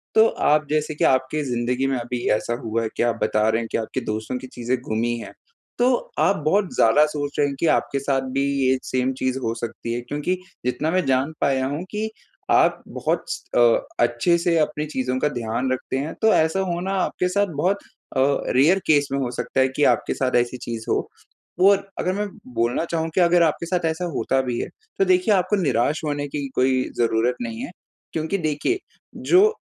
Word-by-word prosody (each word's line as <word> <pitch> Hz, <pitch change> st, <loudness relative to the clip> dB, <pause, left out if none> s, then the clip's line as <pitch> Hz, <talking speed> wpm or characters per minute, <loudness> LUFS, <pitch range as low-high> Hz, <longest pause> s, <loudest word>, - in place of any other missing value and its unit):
तो 220 Hz, +1 st, +7 dB
आप 150 Hz, -7 st, +1 dB
जैसे 155 Hz, 0 st, 0 dB
कि -, -, -1 dB
आपकी 130 Hz, +3 st, +2 dB
ज़िंदगी 125 Hz, +2 st, 0 dB
में 135 Hz, -, 0 dB
अभी 120 Hz, 0 st, -4 dB
ऐसा 120 Hz, -, -3 dB
हुआ 115 Hz, 0 st, -1 dB
है 110 Hz, -, -1 dB
कि -, -, +2 dB
आप 120 Hz, -1 st, 0 dB
बता 110 Hz, 0 st, +2 dB
रहे 115 Hz, +1 st, +1 dB
हैं 115 Hz, -, -5 dB
कि -, -, +1 dB
आपके 115 Hz, +3 st, -3 dB
दोस्तों 110 Hz, +2 st, -3 dB
की 130 Hz, -, -9 dB
चीज़ें 125 Hz, 0 st, -2 dB
गुमी 115 Hz, +2 st, 0 dB
है। 115 Hz, -, -8 dB, 0.5 s
तो 245 Hz, +1 st, +4 dB, 0.3 s
आप 200 Hz, -, +4 dB
बहुत 195 Hz, +4 st, +2 dB
ज़्यादा 130 Hz, +7 st, +5 dB
सोच 145 Hz, -1 st, -4 dB
रहे 145 Hz, -, +4 dB
हैं 140 Hz, -, -4 dB
कि -, -, +1 dB
आपके 140 Hz, -, -2 dB
साथ 135 Hz, -1 st, 0 dB
भी 135 Hz, +1 st, 0 dB, 0.3 s
ये 130 Hz, -, +3 dB
सेम 130 Hz, +1 st, 0 dB
चीज़ 130 Hz, 0 st, 0 dB
हो 115 Hz, 0 st, 0 dB
सकती 115 Hz, 0 st, -5 dB
है 120 Hz, -, -2 dB
क्योंकि 150 Hz, +8 st, -2 dB, 0.3 s
जितना 150 Hz, +5 st, 0 dB
मैं 185 Hz, -3 st, +1 dB
जान 135 Hz, +3 st, +1 dB
पाया 135 Hz, -2 st, +2 dB
हूँ 145 Hz, +5 st, -3 dB
कि 215 Hz, +1 st, -2 dB, 0.4 s
आप -, -, +4 dB
बहुत -, -, -2 dB
स -, -, -4 dB
अ, -, -, +5 dB, 0.4 s
अच्छे 120 Hz, +9 st, +3 dB
से 170 Hz, -1 st, +1 dB
अपनी 150 Hz, 0 st, 0 dB
चीज़ों 130 Hz, -3 st, -2 dB
का 150 Hz, -, +2 dB
ध्यान 120 Hz, +1 st, -2 dB
रखते 130 Hz, 0 st, -2 dB
हैं 145 Hz, +4 st, -3 dB
तो 220 Hz, -1 st, +5 dB
ऐसा 160 Hz, +4 st, +2 dB
होना 185 Hz, 0 st, -2 dB
आपके 180 Hz, -, 0 dB
साथ 205 Hz, +2 st, +1 dB
बहुत 185 Hz, +7 st, +1 dB, 0.4 s
अ, -, -, +4 dB, 0.3 s
रेयर 165 Hz, +9 st, +5 dB
केस 145 Hz, -2 st, +4 dB
में 140 Hz, -, 0 dB
हो 130 Hz, -3 st, -1 dB
सकता 130 Hz, -, -3 dB
है 130 Hz, -, +5 dB
कि 150 Hz, -, +1 dB
आपके -, -, +2 dB
साथ 130 Hz, -1 st, -1 dB
ऐसी 120 Hz, +1 st, +1 dB
चीज़ 115 Hz, -2 st, -6 dB
हो। -, -, +2 dB, 0.7 s
और 200 Hz, 0 st, +2 dB
अगर 185 Hz, -, 0 dB
मैं 205 Hz, +1 st, -2 dB, 0.3 s
बोलना 120 Hz, +7 st, 0 dB
चाहूँ 165 Hz, -1 st, -2 dB
कि 185 Hz, -, +4 dB
अगर 175 Hz, 0 st, +5 dB
आपके 165 Hz, +1 st, 0 dB
साथ 175 Hz, -1 st, -1 dB
ऐसा 160 Hz, +2 st, -1 dB
होता 135 Hz, 0 st, +1 dB
भी 125 Hz, -2 st, -3 dB
है, -, -, -2 dB, 0.3 s
तो 390 Hz, -, +4 dB
देखिए 365 Hz, -, +3 dB
आपको 185 Hz, +2 st, +2 dB
निराश 145 Hz, +1 st, +1 dB
होने 145 Hz, -1 st, -2 dB
की 140 Hz, 0 st, -4 dB
कोई 130 Hz, 0 st, +2 dB
ज़रूरत 115 Hz, +1 st, +2 dB
नहीं 115 Hz, -1 st, -4 dB
है -, -, -6 dB, 0.4 s
क्योंकि 160 Hz, +5 st, -1 dB
देखिए 160 Hz, -, -1 dB, 0.5 s
जो 415 Hz, +5 st, +6 dB
140 Hz, 210 wpm, -23 LUFS, 125-170 Hz, 0.7 s, तो